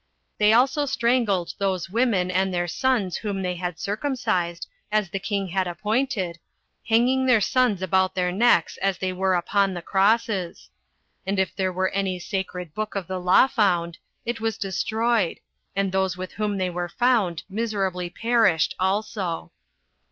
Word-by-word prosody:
They 210 0 +5
also 270 +5 +3
strangled 235 -8 +1
those 190 -2 -1
women 210 -6 +1
and 190 +1 +1
their 175 -1 -1
sons 225 -2 0
whom 200 -3 -3
they 180 0 -1
had 175 -1 -4
circumcised, 205 - -2 0.2
as 210 -4 +1
the 195 - -2
king 195 -1 -2
had 185 +1 0
appointed, 200 -1 -1 0.5
hanging 255 +4 +3
their 250 -3 +5
sons 225 -3 +1
about 190 0 +1
their 180 -1 0
necks 195 -3 +3
as 195 -1 0
they 185 -1 -2
were 190 0 +1
upon 195 +2 +1
the 175 - -5
crosses. 195 -2 0 0.5
And 195 +1 -2
if 190 -1 0
there 190 -1 0
were 185 +1 0
any 195 -2 -1
sacred 180 -2 -4
book 215 +2 -4
of 195 -2 -2
the 185 +2 -4
law 180 +6 +5
found, 175 -9 0 0.3
it 235 -1 -3
was 225 -1 -1
destroyed, 215 +1 0 0.4
and 195 -1 0
those 190 -1 0
with 185 0 -6
whom 210 -1 -2
they 185 -1 -1
were 175 0 -3
found 220 -8 +1
miserably 195 -4 -2
perished 225 -6 +2
also. 190 -2 -2
195 Hz, 160 wpm, -24 LUFS, 180-220 Hz, 0.5 s, They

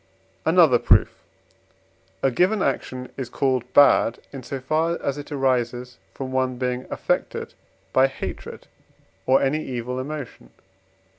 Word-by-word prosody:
Another - - +5
Proof. - - +4 1.1
A 135 - +3
given 185 - +2
action 130 -1 -2
is 130 -3 -4
called 130 -2 -1
bad, 135 -4 +5 0.2
in 135 - -6
so 135 +2 -5
far 155 +5 0
as 140 +1 -3
it 145 - -9
arises 125 -2 -1 0.2
from 130 -1 -5
one 130 -1 0
being 125 0 -2
affected - - -2 0.4
by 130 +1 +5
hatred 135 - -7 0.6
or 130 +1 +4
any 150 +3 0
evil 125 0 -4
emotion. 145 -1 -7
130 Hz, 130 wpm, -23 LUFS, 125-140 Hz, 1.1 s, Another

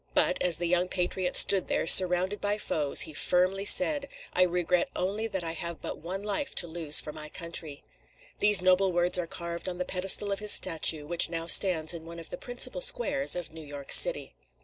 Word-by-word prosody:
But - - 0
as 175 -3 +1
the 175 - -5
young 175 +1 -1
patriot 180 0 -4
stood 195 -2 +5
there, - - -2
surrounded 185 +3 +5
by 205 0 -2
foes, 150 -8 -1
he 155 - -4
firmly 185 +5 -1
said: 280 +4 +4 0.3
"I 185 - -1
regret 180 0 -1
only 205 +5 -4
that 190 -5 -6
I 165 - -4
have 170 0 -7
but - - -8
one 185 +5 -8
life 210 +7 -5
to 175 - +1
lose 160 -2 +2
for 150 - -6
my 150 0 -8
country." 165 -3 -2 0.6
These 205 -3 +3
noble 185 +1 +1
words 175 +1 0
are 170 - -5
carved 170 +1 -7
on 180 - -7
the 180 - -5
pedestal 195 +2 -1
of 195 - -3
his 210 0 +3
statue, 155 -2 +1
which 170 +2 +1
now 165 -1 -4
stands 170 -2 +3
in 165 -1 -10
one 170 0 -11
of 165 -1 -9
the - - -7
principal 245 - -4
squares 485 - +1
of 175 -2 -7
New 160 -1 -12
York 145 -1 -11
city. - - +4
180 Hz, 210 wpm, -26 LUFS, 165-195 Hz, 0.6 s, stood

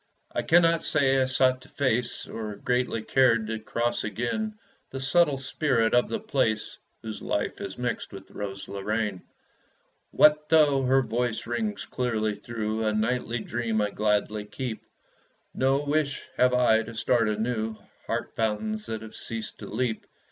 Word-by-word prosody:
I - - -1
cannot 165 0 +4
say 135 -2 +3
I - - +3
sought 130 0 +2
to 130 - -15
face 125 -3 0
Or 110 -2 -5
greatly 125 -1 -1
cared 115 -2 +3
to 110 0 -3
cross 120 +2 -1
again 120 - -2 0.3
The 135 - -6
subtle 140 +2 +3
spirit 130 -4 +1
of 120 0 +3
the 225 - -2
place 130 - -1 0.2
Whose 110 -1 -6
life - - -2
is 95 -1 -6
mixed 125 0 -3
with 95 -1 -11
Rose 100 -1 -6
Lorraine. 105 0 -2 0.9
What 150 0 +4
though 150 -4 +5
her 135 +1 +4
voice 120 0 -1
rings 110 -4 -2
clearly 110 -4 -1
through 110 0 -3
A 110 -1 +1
nightly 115 +2 0
dream 115 -2 -1
I 105 -1 +1
gladly 105 0 0
keep, 115 +1 -5 0.7
No 135 +2 +2
wish 145 -1 0
have 125 0 +4
I 115 -3 +4
to 115 0 -8
start 115 -1 +2
anew 110 0 -1 0.3
Heart - - -3
fountains 210 - -1
that 110 0 -4
have 110 - -10
ceased 115 -2 -6
to - - -8
leap. 115 0 -2
120 Hz, 155 wpm, -27 LUFS, 110-135 Hz, 0.9 s, though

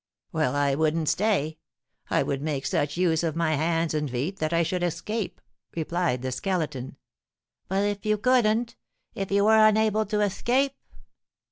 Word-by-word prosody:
"Well, 155 -5 0
I 145 -1 +2
wouldn't 155 +1 +1
stay; 180 -7 0 0.5
I - - +2
would 140 -1 -2
make 145 -3 -2
such 145 +2 -1
use 170 -3 +2
of 165 -3 -1
my 165 -1 +1
hands 165 +2 0
and 150 -2 -1
feet 140 +11 -3
that 155 +1 -1
I 170 0 +3
should 180 +2 -2
escape," 175 +5 -3 0.4
replied 165 -5 -1
the 130 - -2
Skeleton. 150 -5 -3 0.7
"But 195 +2 0
if 205 -1 -2
you 215 -1 +1
couldn't, 235 0 +2 0.4
if 195 -1 -4
you 200 0 +3
were 220 0 +6
unable 215 0 +3
to 210 +1 0
escape?" 250 +7 +1
170 Hz, 160 wpm, -26 LUFS, 155-210 Hz, 0.7 s, were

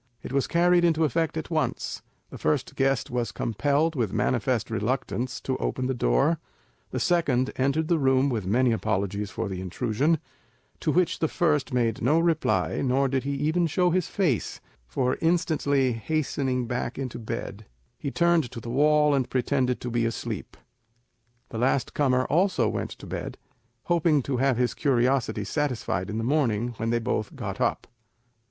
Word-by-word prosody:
It - - -6
was 140 -1 +1
carried 175 +1 +3
into 165 -2 +3
effect 160 +1 0
at 160 - -5
once; 155 -1 -1 0.3
the - - -8
first 145 -4 0
guest 135 -1 +1
was 120 -1 -1
compelled, 145 +8 0
with 115 -7 0
manifest 115 +2 0
reluctance, 125 +2 -2
to 130 - -2
open 130 - -2
the 130 - 0
door; 125 - +2 0.5
the - - -3
second 140 -8 +1
entered 140 +4 +1
the 170 -1 +2
room 130 0 +3
with 110 -8 -2
many 120 +5 +3
apologies 105 -2 -1
for - - -3
the 95 -2 -4
intrusion, 120 - 0 0.6
to 155 - 0
which 180 +2 +1
the 160 - +2
first 150 -4 +1
made 115 -3 0
no 150 +8 +3
reply, 165 -2 +1
nor 135 +1 +2
did 130 0 -1
he 140 0 -1
even 160 +5 +1
show 180 +3 +2
his 180 -1 +1
face; 170 - -1 0.3
for 125 - -1
instantly 155 -6 +2
hastening 130 0 -1
back 120 +1 -3
into 130 -4 -4
bed, 110 - -6 0.3
he 140 - -3
turned 170 -3 +2
to 115 - -7
the 115 +1 -6
wall, 150 +2 +4
and 135 -3 0
pretended 130 0 0
to 125 - -4
be 115 -1 +1
asleep. 115 - -5 0.9
The 110 - -5
last 130 +2 +1
comer 130 -3 +2
also 170 - +2
went - - -2
to - - -10
bed, - - -5 0.5
hoping 165 -5 +2
to 130 0 -2
have 130 -1 +2
his 125 0 +1
curiosity 125 -5 +1
satisfied 120 - -2
in 110 - -3
the 115 - -1
morning 120 -4 +1
when 115 - -2
they 120 - +2
both 115 -2 -2
got - - -5
up. - - 0
130 Hz, 170 wpm, -26 LUFS, 120-155 Hz, 0.9 s, wall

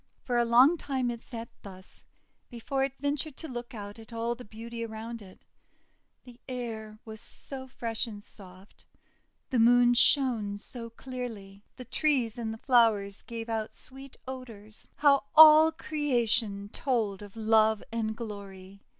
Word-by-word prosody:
For 245 -2 0
a 240 - +3
long 255 +8 +6
time 260 -5 -1
it 235 -1 -7
sat 230 -2 -8
thus, 185 -2 -9 0.4
before 265 +3 -2
it 270 0 -3
ventured 285 +1 -2
to 320 - -8
look 240 -1 -7
out 205 +1 -8
at 225 +1 -14
all 230 +1 -2
the 245 +1 -10
beauty 230 +2 -7
around 225 +1 -6
it. 190 -2 -15 0.8
The 245 -1 -15
air 225 -4 -5
was 220 -1 -9
so 260 +2 -7
fresh, 230 -3 -2
so 215 -3 -8
soft. 190 0 -15 0.7
The 250 - +2
Moon 245 +1 +6
shone 235 -6 +3
so 230 +2 -8
clearly. 230 -5 -8
The 255 - -9
trees 255 -4 0
and 225 -2 -3
the 220 - -6
flowers 220 -6 +3
gave 230 -1 -7
out 220 -1 -3
sweet 270 +1 -11
odours. 225 -5 -10
How 280 -2 +4
all 315 0 +10
Creation 235 -10 0
told 220 -6 -1
of 205 0 -11
love 220 -1 +3
and 220 -1 -2
glory! 200 -3 -9
230 Hz, 150 wpm, -29 LUFS, 215-255 Hz, 0.8 s, all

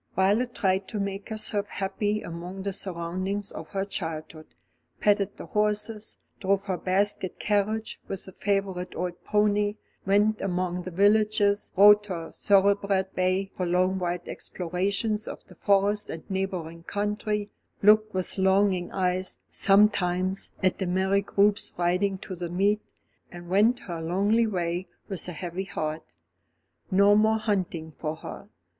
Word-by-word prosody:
Violet 215 +6 +2
tried 190 -2 +1
to 215 - -4
make 200 +1 -4
herself 215 -2 -2
happy 205 +2 -2
among 175 +3 -7
the 200 0 -2
surroundings 185 +3 -3
of - - -8
her 195 -1 -2
childhood, 160 -4 -6 0.5
petted 205 -1 +2
the - - -8
horses, 210 +1 -1 0.2
drove 195 0 +1
her 190 - -1
basket 190 0 0
carriage 215 +1 -1
with 195 - -4
the 190 - -10
favourite 195 -2 -2
old 180 -1 -4
pony, 210 0 +2 0.3
went 210 +2 +2
among 180 -1 -1
the 185 - -6
villagers, 205 +2 +3
rode 205 +1 +8
her 170 -4 -5
thoroughbred 200 -1 +2
bay 185 +1 0
for 180 - -2
long 185 +2 +2
wild 175 -1 -2
explorations 200 +5 -2
of - - -7
the - - -16
Forest 205 +1 +1
and 160 - -7
neighbouring 180 -4 -3
country, 210 +2 -2 0.3
looked 215 +1 +6
with 185 0 +1
longing 190 -1 +2
eyes, 185 0 -1
sometimes, 195 -2 +3
at 185 - +2
the 190 - -1
merry 190 +2 +2
groups 200 +1 +1
riding 180 +3 +1
to 185 - -8
the 175 -1 -5
meet, 200 +4 +1 0.5
and 175 0 -10
went 220 +6 +3
her 170 -3 -6
lonely 200 +7 +2
way 175 -2 -2 0.2
with 195 -4 -1
a - - -4
heavy 175 +2 -5
heart. 155 -3 -4 0.8
No 200 +2 +5
more 220 +1 +4
hunting 185 -7 -2
for 155 -1 -3
her. - - -9
195 Hz, 145 wpm, -27 LUFS, 180-205 Hz, 0.8 s, rode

